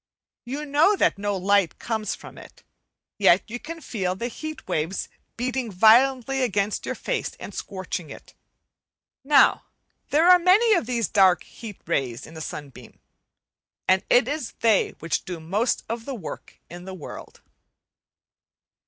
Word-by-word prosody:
You 280 +5 -5
know 300 +8 +4
that 205 - +1
no 205 -1 -1
light 195 -1 +2
comes 220 -2 -3
from - - -13
it, - - -15 0.6
yet 190 -2 +5
you 240 +2 -6
can 330 +4 -8
feel 190 -9 -3
the 235 +5 -4
heat 310 +5 -8
waves 160 +5 -2 0.3
beating 250 -1 -2
violently 255 +6 +4
against 205 -4 -1
your - - -2
face - - -3
and - - -8
scorching 185 -5 -5
it. - - -12 0.9
Now 285 +2 +4 0.4
there 315 +4 +3
are 360 0 +8
many 405 +6 +5
of 345 - +1
these 235 -5 0
dark 190 -4 +4
heat 215 -4 -10
rays 130 -8 -2
in 165 - -13
a 160 - -7
sunbeam, 140 -5 -9 0.9
and 185 0 +3
it 245 -1 +5
is 290 -3 -4
they 225 -4 +3
which 165 +1 -2
do 180 -3 -6
most 200 +10 -1
of 230 0 -5
the 275 - -4
work 190 -9 -9
in 175 +1 -10
the 190 0 -7
world. 165 - -10
220 Hz, 155 wpm, -24 LUFS, 185-265 Hz, 0.9 s, are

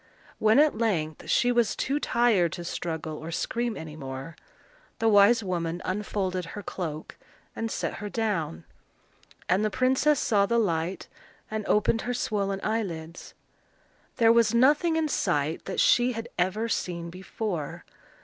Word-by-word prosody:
When 220 +2 +4
at 295 -6 +4
length 160 -9 -1
she 245 - +3
was 235 -3 +2
too 280 +2 -1
tired 225 - +2
to 175 - -6
struggle 160 -2 -4
or 160 - -7
scream 235 +6 -2
any 155 -2 -8
more, 135 +2 -7 0.6
the 225 - +1
wise 210 +2 +6
woman 175 -2 -2
unfolded 185 -2 -2
her 200 +5 -8
cloak, 160 -5 -6 0.4
and 225 - -3
set - - -2
her 205 - -4
down; 185 - -2 0.8
and 190 +3 +2
the 215 - +2
princess 260 +6 +2
saw 200 -3 +2
the 235 - +1
light 175 -4 -1 0.4
and 215 0 -2
opened 210 +2 +2
her 245 0 -2
swollen 200 -5 -1
eyelids. 175 -7 -4 0.8
There 230 -2 +5
was 230 -1 +3
nothing 295 +7 +4
in 320 -1 +1
sight 160 - -1
that 190 - -3
she 245 +1 +4
had 225 0 -5
ever 190 +6 0
seen 170 -6 -3
before. 185 -3 -5
205 Hz, 150 wpm, -27 LUFS, 170-230 Hz, 0.8 s, wise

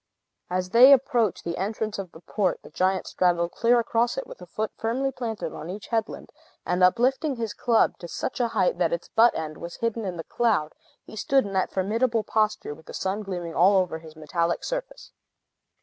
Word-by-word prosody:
As 185 0 -2
they 250 +5 +8
approached 245 -6 +2
the 170 0 -4
entrance 210 +2 -3
of 185 -3 -6
the 160 - -14
port, 195 0 -1
the - - -13
giant 190 +1 0
straddled 175 -1 +1
clear 240 +1 +3
across 235 +1 0
it, 270 - -3
with - - -12
a 180 - -10
foot 215 +5 -3
firmly 255 +4 -1
planted 230 -4 -4
on 155 +2 -7
each 200 +3 -7
headland, 225 -1 -3 0.3
and 180 +1 +1
uplifting 260 - +3
his 225 -3 -3
club 230 0 +2
to 175 - -7
such 250 - -4
a 240 - +2
height 230 - 0
that - - +2
its - - -3
butt 235 +1 +4
end 155 -1 -5
was 170 0 -7
hidden 230 -1 -2
in 185 -3 -4
the 165 - -5
cloud, 205 -11 0 0.3
he - - -11
stood 270 +3 +2
in 200 - -6
that 190 -1 0
formidable 225 +4 0
posture, 215 -9 0
with 160 +1 -17
the - - -8
sun 190 +3 -2
gleaming 175 -4 -5
all 190 +4 +5
over 180 -4 0
his 160 -1 -13
metallic 170 +2 -1
surface. - - -5
210 Hz, 205 wpm, -25 LUFS, 180-235 Hz, 0.3 s, they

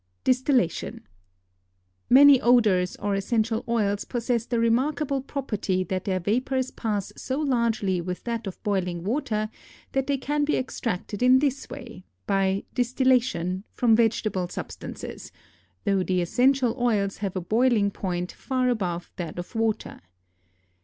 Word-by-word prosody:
DISTILLATION. 255 - +1 1.0
Many 275 0 +8
odors 210 -7 +3
or 205 0 -2
essential 220 +3 0
oils 205 -3 +1
possess 235 -1 -2
the 240 - -1
remarkable 270 +4 +1
property 215 -9 -2
that 185 0 -3
their 185 -2 0
vapors 255 +7 0
pass 210 -4 -3
so 265 +2 -3
largely 230 - +1
with 180 +1 -5
that 230 -3 -3
of 190 - -8
boiling 180 -5 -1
water 215 -1 -1 0.4
that 270 0 -1
they 280 -1 +1
can 295 +2 -1
be 295 - +1
extracted 220 -5 -3
in 255 +1 +6
this 275 0 -1
way 245 -8 -9 0.2
(by 195 0 +1
"distillation") 245 -8 +1
from 230 -3 +4
vegetable 215 -5 +1
substances, - - -7 0.5
though 195 -1 +2
the 185 0 0
essential 250 +7 +2
oils 205 -5 +1
have 195 -2 -4
a - - 0
boiling 215 +2 +2
point 180 -2 -3
far 255 -2 -1
above 180 -7 -2
that 170 -4 -5
of 175 - -7
water. 225 -2 -2
225 Hz, 135 wpm, -25 LUFS, 190-255 Hz, 1.0 s, Many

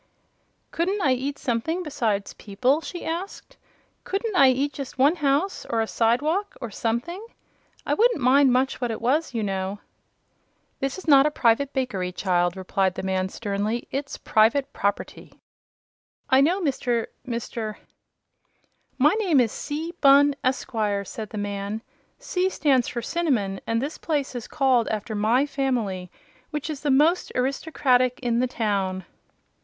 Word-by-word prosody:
"Couldn't 375 +5 0
I 270 - +3
eat 275 +3 -3
something 295 +9 -2
besides 225 - -2
people?" 250 +9 0
she 350 +1 -7
asked. 375 +9 -5 0.5
"Couldn't 405 +2 -2
I 275 -6 +7
eat 275 +3 0
just 270 -2 -7
one 285 +7 +4
house, 295 +6 0
or 230 - 0
a 225 - +2
side 230 +4 +1
walk 385 +7 -1
or 235 -4 -6
something? 240 - -2 0.6
I - - +1
wouldn't 470 -4 +3
mind 265 +1 +5
much 260 +1 +1
what 245 - 0
it 225 - -3
was, 260 +3 0
you 225 - 0
know." 195 0 -2 1.0
"This 270 +4 -2
is 375 - -10
not 280 -1 +7
a - - +2
public 265 0 +2
bakery, 245 -10 -2
child," 175 -1 0
replied 190 0 0
the - - -5
man, 190 0 -1
sternly. 210 +3 -3
"It's 280 +1 -4
private 230 +6 +2
property." 200 0 -3 0.9
"I 265 +1 +6
know 345 +7 +3
Mr. 245 -7 0 0.2
Mr. 230 -2 -4 0.6
" - - -44
"My 310 - +4
name 350 -10 +3
is 235 -4 +2
C. 315 +4 -5
Bunn, 280 0 +6
Esquire," 220 -6 -1
said 215 +2 -7
the 215 - -7
man. 205 +2 -4 0.3
"'C' 375 -7 -1
stands 270 -9 +2
for 235 -1 -4
Cinnamon, 235 - -1
and 230 0 +1
this 285 +5 -4
place 290 -5 -2
is 245 -3 -6
called 255 -4 +2
after 215 +1 -3
my 220 +6 +2
family, 240 -10 -2 0.4
which 300 0 -4
is 290 - -6
the 295 - -1
most 300 +7 +3
aristocratic 255 -1 +1
in 235 -1 +1
the 255 - +2
town." 195 -6 -2
255 Hz, 155 wpm, -24 LUFS, 220-290 Hz, 1.0 s, I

